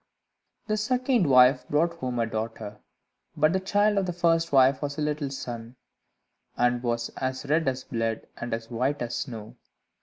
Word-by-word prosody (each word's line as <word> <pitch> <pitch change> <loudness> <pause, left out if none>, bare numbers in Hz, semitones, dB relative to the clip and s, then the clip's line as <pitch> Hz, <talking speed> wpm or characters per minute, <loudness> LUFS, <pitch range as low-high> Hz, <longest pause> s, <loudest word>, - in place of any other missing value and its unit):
The 215 -1 -1
second 250 - +1
wife 130 +1 +5
brought 165 +3 +1
him 125 -1 -2
a 115 - +1
daughter, 110 -2 -5 0.6
but 155 +2 +3
the 190 - +2
child 205 +2 +2
of 190 - -2
the 180 - -2
first 165 -1 +1
wife 135 0 +5
was 145 -1 -3
a - - -2
little 150 -1 -1
son, 120 -3 -7 0.8
and 120 0 +2
was 120 -1 -1
as 130 +1 -3
red 155 +2 +1
as 130 0 -1
blood, 115 -1 -2
and 120 - -6
as 115 +1 -4
white 130 +4 -1
as 120 0 -4
snow. 115 -6 -6
135 Hz, 175 wpm, -26 LUFS, 120-165 Hz, 0.8 s, wife